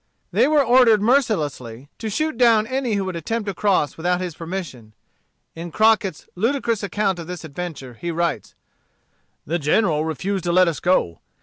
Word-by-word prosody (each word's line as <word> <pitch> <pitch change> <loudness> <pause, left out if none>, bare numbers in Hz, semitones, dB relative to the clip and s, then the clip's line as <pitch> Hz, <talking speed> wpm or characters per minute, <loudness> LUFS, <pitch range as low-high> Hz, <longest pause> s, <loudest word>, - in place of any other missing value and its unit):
They - - +3
were 300 -1 +4
ordered 240 -3 +5
mercilessly 150 - 0
to 220 - -4
shoot 310 +7 -1
down 230 -3 +4
any 255 -2 -1
who 195 -1 -1
should 185 -2 -4
attempt 215 +7 -3
to 200 - -3
cross 185 -5 0
without 180 +2 0
his 180 -2 -4
permission. 160 - -7 0.6
In 170 +1 -7
Crockett's 215 -4 +2
ludicrous 230 +2 0
account 200 -2 -1
of 165 - -7
this 180 -1 -7
adventure, 155 -4 -7
he 170 +9 -6
writes: 170 - -2 0.9
"The 170 +4 -1
General 155 +1 +1
refused 180 +4 -3
to 175 - +1
let 185 +1 +5
us 165 - -2
go. 130 - +1
185 Hz, 170 wpm, -21 LUFS, 160-220 Hz, 0.9 s, ordered